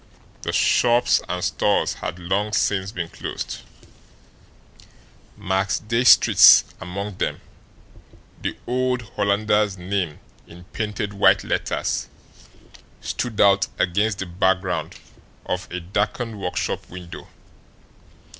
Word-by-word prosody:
The - - -3
shops 120 0 +3
and 90 0 -3
stores - - +1
had 85 - -6
long 95 +4 -2
since 100 -2 0
been 85 -4 -5
closed, - - -6 1.8
Max 95 +1 0
Diestricht's 115 +3 +6 0.2
among 100 +2 -6
them - - -1 1.0
the - - -3
old 125 0 -1
Hollanders' 105 0 +1
name 90 -3 -3 0.3
in 90 +1 -13
painted 105 -1 -3
white 100 - +4
letters - - -2 0.9
stood 120 -4 -4
out 100 0 +4
against 100 +4 +1
the 95 - -4
background 90 -2 -1 0.5
of 90 0 -3
a 90 - -3
darkened 105 +4 -3
workshop 90 - -3
window. 90 -1 -10
100 Hz, 100 wpm, -22 LUFS, 90-105 Hz, 1.8 s, Diestricht's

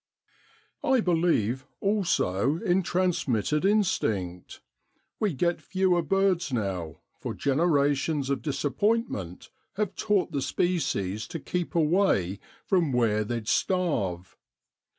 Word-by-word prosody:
'I 265 -4 +3
believe, 160 - +1
also, 165 - +1
in 180 +2 +1
transmitted 160 - 0
instinct; 110 - 0 0.6
we 210 -3 +1
get 170 +4 0
fewer 185 -2 +1
birds 180 -1 +1
now, 95 - -3 0.2
for - - -5
genera 145 0 +2
tions 140 0 -2
of 140 - -1
disappointment 145 - -1 0.2
have 205 -1 -1
taught 205 -5 +1
the 140 -3 -1
species 110 - -1
to 165 - -5
keep 175 +4 -3
away 155 - +2 0.3
from 175 -7 +2
where 115 -4 +2
they'd 115 0 -4
starve. 120 - 0
155 Hz, 110 wpm, -27 LUFS, 110-185 Hz, 0.6 s, I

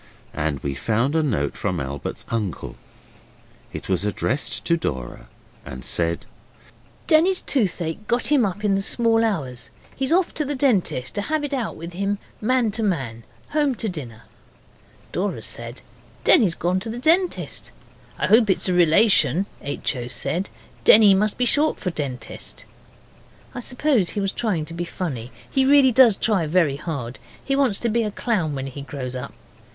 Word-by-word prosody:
And 75 -2 -2
we 70 - -2
found 115 - 0
a 160 - +3
note 105 - -1
from 90 -4 -2
Albert's 70 0 -5
uncle. 105 -7 -3 1.0
It - - -7
was 95 -1 0
addressed 120 +3 -2
to 170 - +3
Dora, 65 - -5 0.4
and 65 0 -8
said 85 -1 -1 0.8
'Denny's 350 +4 +3
toothache 195 - -1
got 245 +4 0
him 285 -5 +5
up 205 +1 -2
in 200 - +3
the 195 - +1
small 225 +2 +2
hours. 135 - -2 0.3
He's 265 +1 -1
off 355 +1 +2
to 305 - -1
the 290 0 -3
dentist 205 - +1
to 205 - -2
have 305 +7 -1
it 290 -1 -3
out 250 -5 -2
with 170 +2 -8
him, 200 +3 -1 0.2
man 245 0 +2
to 220 +3 -3
man. 130 - -2 0.2
Home 290 -3 +1
to 225 - -3
dinner.' 125 - -7 0.9
Dora - - -2
said, - - -4 0.4
'Denny's 180 -6 +5
gone 180 +2 0
to 225 - -6
the 230 - -5
dentist.' 335 +8 0 0.5
'I - - -5
expect 220 -1 +5
it's 190 - +2
a - - +2
relation,' 180 +2 +4 0.2
H. 140 0 -2
O. 120 -1 -5
said. 180 +9 -1 0.3
'Denny 210 -2 +8
must 205 +2 +1
be 250 - +1
short 295 +5 +2
for 180 - -2
Dentist.' 135 -6 -5 0.9
I 250 - -5
suppose 250 - +1
he - - -3
was 195 -1 0
trying 190 -10 -1
to 165 - -9
be 170 +1 -3
funny 135 -9 -5 0.2
he 265 - +2
really 275 -1 +6
does 240 -3 +6
try 195 -8 +1
very 155 -4 +2
hard. 140 -6 -5 0.3
He 275 - +1
wants 270 -8 +2
to 235 - +1
be 230 +2 +1
a 215 - -1
clown 195 -8 -1
when 135 0 -4
he 135 +1 -7
grows 135 -3 -6
up. 125 +2 -6
185 Hz, 175 wpm, -23 LUFS, -, 1.0 s, Denny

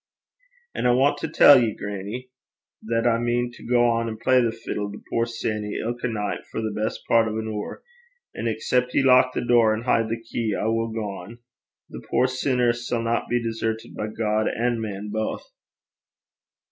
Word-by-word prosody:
'An' - - 0
I 120 - +5
want 135 +3 +3
to - - -3
tell 145 -3 +7
ye, 110 -3 0
grannie, 105 +6 -6 0.5
that 115 +1 -1
I 115 -1 +3
mean 120 +1 0
to - - -14
gang 120 -1 +2
an' 110 -1 -5
play 130 +3 +3
the 115 -2 +1
fiddle 105 -2 -5
to 105 - -9
puir 115 0 +1
Sanny 105 -3 -3
ilka 120 +2 -3
nicht 105 -3 -3
for - - -5
the 110 -1 -2
best 110 +1 -2
pairt 115 -1 +4
o' 110 0 -3
an 110 - -3
hoor; 105 -1 -5 0.5
an' 115 - -3
excep' 125 +3 0
ye - - +4
lock 130 -1 +5
the - - -1
door 115 -3 +4
an' 110 - -5
hide 115 -2 +1
the 115 +1 -2
key, 115 -2 -3
I - - -2
will 115 +1 +1
gang. 105 -1 -6 0.5
The 60 - -8
puir 125 - +3
sinner 130 -2 +1
sanna 120 -1 -2
be 120 -1 0
desertit 115 -1 -3
by 105 - -3
God 110 0 0
an' 120 0 0
man 105 -1 -5
baith.' 110 0 -3
115 Hz, 185 wpm, -24 LUFS, 110-120 Hz, 0.5 s, tell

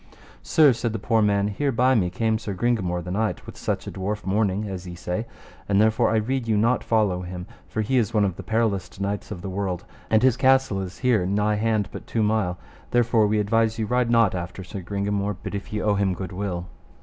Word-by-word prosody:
Sir, 150 -4 +5
said 115 -1 -2
the - - -1
poor 110 +2 +1
man, 100 -1 +2
here 135 +7 -1
by 125 +2 +3
me 95 -8 +2
came 110 +4 0
Sir 100 -3 -5
Gringamore 95 -5 0
the 90 - -6
knight, 110 +3 -1
with - - -9
such - - -3
a - - -5
dwarf 105 +2 -4
mourning 100 +1 0
as 95 -2 -6
ye 90 - -7
say; 90 +6 -3 0.4
and 100 0 +3
therefore 110 +1 +3
I 110 - +1
rede 115 +3 0
you 110 -2 +2
not 115 +4 +2
follow 105 -5 +1
him, 90 0 -6 0.2
for 110 - -2
he 130 +4 +2
is 110 -2 0
one 105 -3 +3
of 95 -3 -2
the - - -7
periloust 100 -5 -1
knights 100 +1 -3
of 90 - -7
the - - -4
world, 95 -2 -3 0.2
and 110 +1 +3
his 130 -2 +4
castle 130 -7 +3
is 95 -1 -6
here 110 -8 +3
nigh 105 +2 +1
hand 110 -1 +1
but - - -9
two 115 - 0
mile; 105 -4 +1 0.3
therefore 115 -3 +3
we 105 +1 +1
advise 110 +2 +2
you 110 - -1
ride 125 +1 +1
not 115 -4 +4
after 90 +1 -5
Sir 95 +2 -7
Gringamore, 100 +1 -2
but - - -5
if 100 0 -5
ye 105 - -2
owe 105 - +3
him 100 -2 +1
good 95 -1 -6
will. 90 -2 -3
105 Hz, 235 wpm, -24 LUFS, 95-115 Hz, 0.4 s, Sir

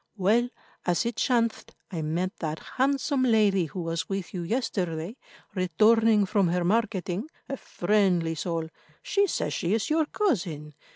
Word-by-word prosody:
Well, 220 +6 +3 0.3
as 175 +3 +1
it 235 -1 -2
chanced, 235 -3 0 0.2
I 170 -4 -3
met 175 +6 -2
that 155 -2 -3
handsome 275 - 0
lady 210 -7 +3
who 170 +4 -5
was 165 0 -3
with 195 -2 -4
you 180 - -3
yesterday, 180 -3 -2 0.4
returning 215 +4 +4
from 195 -1 +2
her 175 +1 +1
marketing—a 215 - -2
friendly 180 -6 +1
soul—she 170 - -2
says - - -1
she 185 +3 0
is 225 +6 -2
your 315 -1 +2
cousin. 175 - -1
195 Hz, 135 wpm, -27 LUFS, 170-230 Hz, 0.4 s, returning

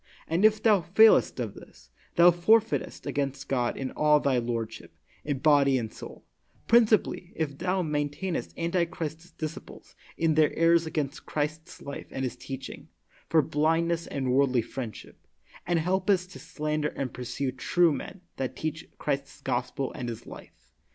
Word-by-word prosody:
And 165 +5 0
if 215 0 +4
thou 215 -3 +5
f 175 +4 -13
ailest 220 -10 +6
of 115 -5 -3
this, - - -16 0.2
thou 170 +1 +8
f 175 +2 -3
orf 225 0 +6
eitest - - -4
against 135 -1 -3
God 125 -3 0
in 135 -1 -4
all 150 0 +4
thy 135 -3 +1
lordship, 115 -2 -4 0.3
in 145 -2 -2
body 140 -2 +4
and 115 -3 -4
soul; - - -11 0.4
principally 220 -6 +3
if 150 -3 -2
thou 185 +1 0
maintainest 150 +3 -3
antichrist's 170 -1 -2
disciples 155 0 -8 0.2
in 160 -1 +2
their 155 -1 +4
errors 165 0 +4
against 150 -2 -3
Christ's 155 +3 -4
life 140 - -7
and 130 - -4
His 130 - -2
teach 135 -1 -7
ing, - - -11 0.4
for 160 -2 +4
blindness 165 +3 +1
and 130 -2 -2
worldly 130 -3 +3
friendship, 120 -4 -8 0.4
and 175 -1 +2
helpest 185 +2 +1
to 155 - -10
slander 150 0 -2
and 130 -3 -3
pursue 130 +2 -3
true 170 +5 +2
men 185 - -7 0.2
that 130 -1 -3
teach 155 +2 -4
Christ's 140 -1 -3
gospel 125 +1 -2
and 120 -1 -5
His 115 - -7
life. - - -13
150 Hz, 165 wpm, -27 LUFS, 135-170 Hz, 0.4 s, thou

